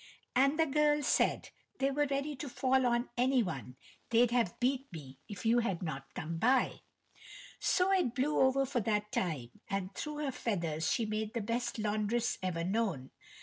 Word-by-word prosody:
And 275 +4 +4
the 320 - +4
girl 295 0 +2
said: - - +1 0.3
"They 275 +1 +1
were 290 +1 +1
ready 280 +2 -2
to 280 +2 -5
fall 260 0 +2
on 240 +1 +1
any 255 0 +3
one; 135 - -5 0.3
they'd 235 +1 +4
have 235 -7 +1
beat 265 +2 0
me 135 -5 -10
if 200 -1 -7
you 235 +2 +4
had 195 -7 -1
not 135 -5 -5
come 165 +1 -4
by." 250 +6 +2 0.8
So 370 +1 +2
it 360 -11 +2
blew 280 +3 +1
over 265 +1 +4
for 260 -1 -1
that 210 -1 -1
time, 145 -10 -2 0.2
and 195 0 -2
through 300 0 -4
her 275 - -1
feathers 170 -10 -1
she 230 - +1
made 215 +1 -3
the 230 - 0
best 235 +4 -2
laundress 215 +2 0
ever 175 -3 -2
known. 190 - -1
235 Hz, 180 wpm, -33 LUFS, 185-270 Hz, 0.8 s, And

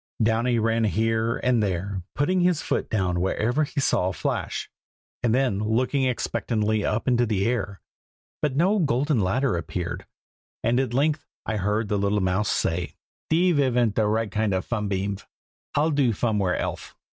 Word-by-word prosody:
Downy 115 +2 +2
ran 115 0 +2
here 115 +2 +1
and 125 -3 +2
there, 95 0 -2
putting 180 +6 +1
his 180 -3 +2
foot - - -1
down 90 -4 0
wherever 120 +9 +1
he 145 - -4
saw 115 -8 +2
a 95 - -1
flash, - - -3 0.5
and 120 - +1
then 125 -5 +1
looking 125 +6 +1
expectantly 110 -4 0
up 105 +5 -1
into 120 -1 +3
the 100 -3 0
air. 105 -5 -2 0.6
But 145 -3 0
no 190 +8 +3
golden 140 -3 +1
ladder 115 +5 +1
appeared, 85 -3 -4 0.6
and 120 +2 +2
at 130 -3 -1
length 150 +3 +1 0.2
I 110 - -1
heard 105 +3 0
the 105 0 0
little 100 +1 +1
mouse 95 +2 0
say, 85 +1 -1 0.3
"Deve 175 0 +3
ivn't 120 -5 +2
de 110 0 +1
right 110 -1 0
kind 105 -2 0
of 95 - -2
funbeamv. 100 -3 -2 0.5
I'll 155 +3 +2
do 140 -5 +2
fomewhere 105 -5 0
elfe." - - -4
115 Hz, 165 wpm, -25 LUFS, 100-130 Hz, 0.6 s, into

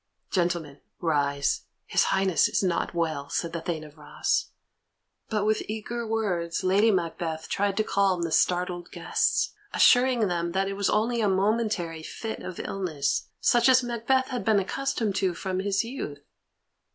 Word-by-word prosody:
"Gentlemen, 170 -5 -1 0.2
rise; 140 -3 0 0.2
his - - +2
Highness 190 -2 +2
is - - 0
not 175 -2 -1
well," 155 -4 -1
said 170 -1 -2
the 170 - -3
Thane 160 -2 -3
of 150 0 -14
Ross. 150 - -1 0.8
But 210 -2 0
with 215 0 +2
eager 225 +2 -4
words 185 -7 -1
Lady 195 +4 +4
Macbeth 165 -4 -1
tried 200 0 0
to 215 - +3
calm 195 -4 +1
the 165 - -2
startled 180 +1 +1
guests, - - 0 0.2
assuring 245 -3 +5
them 170 -1 -2
that 195 0 +1
it 195 - -2
was 200 0 0
only 230 +2 +1
a 210 - +2
momentary 195 -4 0
fit 220 +7 -6
of 185 - -7
illness, 160 -8 -2
such 240 +1 +4
as 255 0 +6
Macbeth 245 +2 0
had 250 -2 -3
been 220 -2 +3
accustomed 225 +1 -1
to 185 -3 +1
from 185 +1 -3
his 195 +1 +1
youth. 230 - -5
190 Hz, 160 wpm, -27 LUFS, 170-220 Hz, 0.8 s, as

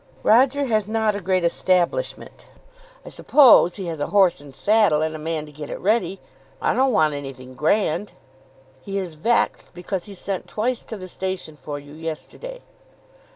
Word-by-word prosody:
"Roger 265 +5 +4
has 215 -5 0
not 220 -1 0
a 200 - -4
great 185 0 +1
establishment." 185 - -1 0.6
"I - - -8
suppose 250 - +5
he 195 - -6
has 165 -3 -5
a 145 - -1
horse 190 -6 +3
and 140 -2 -12
saddle, 205 -7 +3
and 160 0 -2
a - - -6
man 155 0 -3
to 150 - -13
get 150 0 -8
it - - -5
ready. 195 -3 0 0.4
I - - +1
don't 265 +1 +2
want 155 -8 +3
anything 135 -3 -8
grand." 200 - 0 0.7
"He 195 +7 -5
is 185 -4 -4
vexed 230 +10 0
because 180 +1 -4
he 200 - -10
sent 190 0 -4
twice 240 +3 -2
to 220 - -7
the 185 -1 -8
station 185 -4 -5
for 145 +1 -7
you 145 0 -12
yesterday." 165 - -7
185 Hz, 175 wpm, -22 LUFS, 155-215 Hz, 0.7 s, suppose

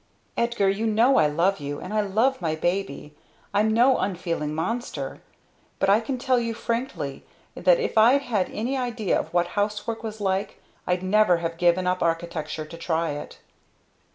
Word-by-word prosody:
"Edgar! 235 -4 +1
You 200 +4 +1
know 230 +5 +4
I 155 - +5
love 170 +6 +1
you. 145 0 -5
And 190 - -7
I 215 - +2
love 220 +6 +1
my 160 -2 0
baby 175 -4 -2 0.4
I'm 210 +2 +3
no 245 +4 +4
unfeeling 165 -5 -2
monster! 230 +10 -3 0.6
But 195 - +2
I 205 - +5
can 255 +3 -3
tell 255 0 +2
you 230 -1 -2
frankly 230 - -3 0.3
that - - +3
if 460 - +1
I'd 255 +6 +5
had 210 -8 0
any 240 +6 -2
idea 240 -6 0
of - - -6
what 175 0 +1
housework 210 +2 -2
was 220 -1 -6
like 195 -1 -1 0.3
I'd 180 0 0
never 190 -1 +4
have 165 0 -3
given 175 +1 +2
up 180 0 0
architecture 165 -2 -2
to 165 +2 -10
try 165 -1 -1
it." 145 0 -8
195 Hz, 175 wpm, -25 LUFS, 170-230 Hz, 0.6 s, I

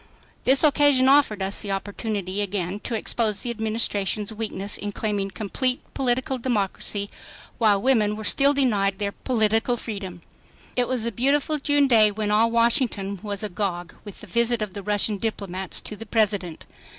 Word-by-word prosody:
This 265 +3 +5
occasion 285 -3 +4
offered 265 -8 +4
us 195 +1 +1
the 205 - -4
opportunity 200 -1 -3
again 195 -1 -2
to 235 - -2
expose 220 -1 -1
the 240 - -1
Administration's 215 -2 -1
weakness 205 -2 -4
in 205 - -4
claiming 205 -2 -2
complete 250 +6 -2
political 260 0 -1
democracy 205 -3 -1 0.5
while 210 -4 +4
women 215 -3 +2
were 215 - -7
still 275 +6 +4
denied 210 -9 +1
their 200 0 -2
political 225 +1 +1
freedom. 195 -7 -7 0.5
It 245 -1 +1
was 250 -3 -1
a 235 - -1
beautiful 280 +6 +1
June 290 0 +3
day 220 -4 +5
when 210 0 -2
all 220 +2 +4
Washington 230 -4 +1
was 205 0 -3
agog 180 -3 -3
with 205 -2 -11
the - - -9
visit 235 +3 +1
of 200 -3 -6
the 200 - -6
Russian 205 0 +1
diplomats 190 -4 -3
to 210 - -5
the 225 +1 -10
President. 205 -6 -1
215 Hz, 165 wpm, -24 LUFS, 200-240 Hz, 0.5 s, This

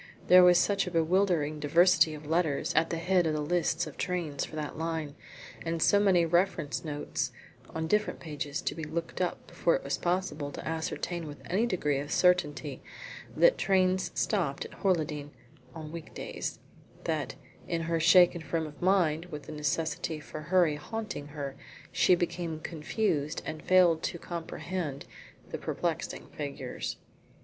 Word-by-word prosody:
There 180 0 +9
was 180 -1 +7
such 200 +1 +2
a - - -1
bewildering 165 -3 +2
diversity 165 +1 +4
of 150 0 -10
letters 160 -2 0
at 160 +1 +3
the 165 - -2
head 180 0 +2
of 155 - +1
the - - -1
lists 170 +1 +1
of - - -10
trains 170 -6 -2
for - - -7
that 150 -2 -4
line, 160 -2 -3 0.5
and 165 0 -2
so 200 +5 +5
many 190 -4 +4
reference 170 -3 +1
notes 145 -4 -3 0.4
on 160 0 -1
different 210 +5 +1
pages 150 0 -4
to - - -1
be 160 - -6
looked 165 +3 -4
up 180 - -2
before - - +1
it - - -3
was - - -2
possible 175 -5 -1
to - - -7
ascertain 165 +1 -3
with 145 - -8
any 210 +7 +1
degree 150 -9 0
of 145 +2 -6
certainty 150 -6 +2 0.5
what - - +5
trains 185 -1 +2
stopped 170 -10 0
at - - -10
Horleydene 155 -6 0 0.5
on 155 -1 -7
week 165 -1 -9
days, - - -4 0.5
that, - - -2 0.3
in 165 -1 -1
her 165 0 0
shaken 175 +1 +6
frame 160 +2 -2
of 150 -1 -11
mind, 175 -4 +2
with 150 -4 -7
the - - -9
necessity 155 +1 -2
for 155 +1 -8
hurry 170 -2 +3
haunting 215 -2 -5
her, 145 -2 -5 0.4
she 180 - +5
became 170 -2 -2
confused, 155 -1 -1
and 155 0 -5
failed 175 -2 +5
to - - -2
comprehend 170 -3 -5 0.5
the - - -4
perplexing - - -3
figures. 140 -4 -5
165 Hz, 160 wpm, -30 LUFS, 150-180 Hz, 0.5 s, There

